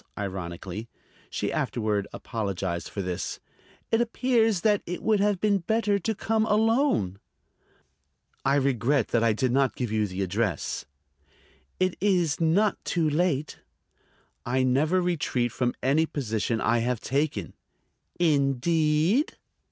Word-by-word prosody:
ironically. 95 +2 -5 0.4
(She - - -2
afterward 105 -3 -1
apologized 95 -5 -3
for 100 - -4
this.) 90 -1 -4 0.5
"It 225 - +3
appears 230 -4 +2
that 210 0 +3
it 175 +1 -5
would 215 -2 +3
have 205 -2 +2
been 205 -1 +2
better 205 +2 +1
to 220 +4 -2
come 220 +2 0
alone." 220 - +2 1.2
"I 135 +1 +3
regret 135 -2 +1
I 115 -1 +3
did 125 +3 0
not 135 +1 +2
give 120 -4 -3
you 110 -1 +1
the 95 +1 -3
address." 95 -2 -2 0.9
"It 185 -1 +1
is 180 -6 +2
not 190 +6 +2
too 165 -3 0
late." 155 -2 0 0.8
"I 130 +2 +1
never 150 +8 +2
retreat 145 -8 0
from 125 +1 -1
any 150 +5 +3
position 115 -5 -2
I 115 +1 +2
have 120 0 -1
taken." 140 +5 -1 0.7
"Indeed?" 155 - +2
140 Hz, 125 wpm, -26 LUFS, 115-185 Hz, 1.2 s, It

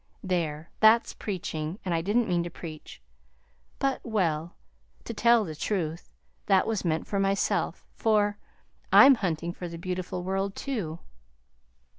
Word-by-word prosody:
There! 165 -4 -2
that's 220 +2 +5
preaching, 170 -4 -4
and 180 - 0
I 165 - +1
didn't 220 +6 +1
mean 175 -2 +1
to 170 - -4
preach; 160 - -9 0.8
but 275 -1 -1
well, 175 -7 -1 0.5
to 230 - -6
tell 235 0 +4
the 160 - -5
truth, 165 -1 -3 0.4
that 195 -2 +4
was 220 -3 -1
meant 160 -2 0
for 200 - -2
myself, 195 0 0
for 210 -2 +1 0.5
I'm 275 +1 +9
hunting 175 -6 -2
for 175 - -6
the 170 0 -7
beautiful 180 0 -4
world, 195 +1 -2
too." 205 - -3
185 Hz, 140 wpm, -27 LUFS, 165-210 Hz, 0.8 s, I'm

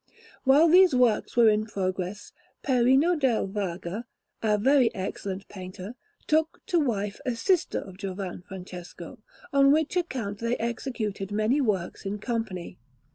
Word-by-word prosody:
While 285 +5 +6
these 360 -2 +6
works 245 -2 +2
were 235 -1 +7
in 215 0 +2
progress, 185 -1 -3 0.3
Perino 265 +5 +4
del 265 -7 +1
Vaga, 195 +1 -4 0.4
a 215 -2 +2
very 260 +2 +4
excellent 195 0 -5
painter, 185 +2 -8 0.3
took 315 +1 +1
to 345 - +2
wife 210 -8 -2
a 250 - -1
sister 355 +9 +1
of 190 -2 -7
Giovan 190 -2 -5
Francesco; 180 +3 -10 0.3
on 275 0 +6
which 315 +4 +1
account 250 - -2
they 230 +1 -1
executed 225 -4 -3
many 215 +7 +2
works 200 -8 -1
in 200 +1 -3
company. 215 - -4
220 Hz, 135 wpm, -27 LUFS, 195-265 Hz, 0.4 s, were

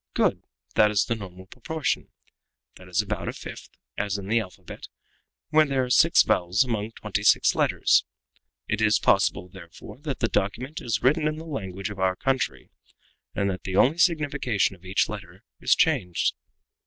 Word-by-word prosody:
Good! - - +1 0.3
that 105 - +5
is 105 -1 +2
the - - -1
normal 95 -4 -9
proportion. 140 - -3 0.7
That 90 - -14
is 90 +3 0
about 105 +1 -4
a - - -3
fifth, - - -9 0.3
as 100 -1 -1
in 100 - -7
the 115 +1 +3
alphabet, 95 -5 -9 0.6
where 155 0 +4
there 135 -2 0
are 125 - -4
six 165 +7 +6
vowels 95 0 +2
among 115 -3 -3
twenty - - -3
six - - +4
letters. - - +3 0.6
It 105 0 -1
is 110 0 +4
possible, 95 -2 +2
therefore, 90 +5 -13
that 145 -3 -4
the 115 - +1
document 125 +11 -2
is 115 -6 -2
written 150 +4 +3
in 155 - -1
the 160 +1 -9
language 100 - -5
of 100 - -9
our 95 -1 +1
country, 135 +5 -2 0.6
and 100 - 0
that 95 - -6
only 125 +7 +5
the 170 - -13
signification 145 - +1
of 90 0 -21
each 95 +1 +1
letter - - -9 0.2
is - - +3
changed. 90 -1 +1
110 Hz, 175 wpm, -25 LUFS, 95-135 Hz, 0.7 s, six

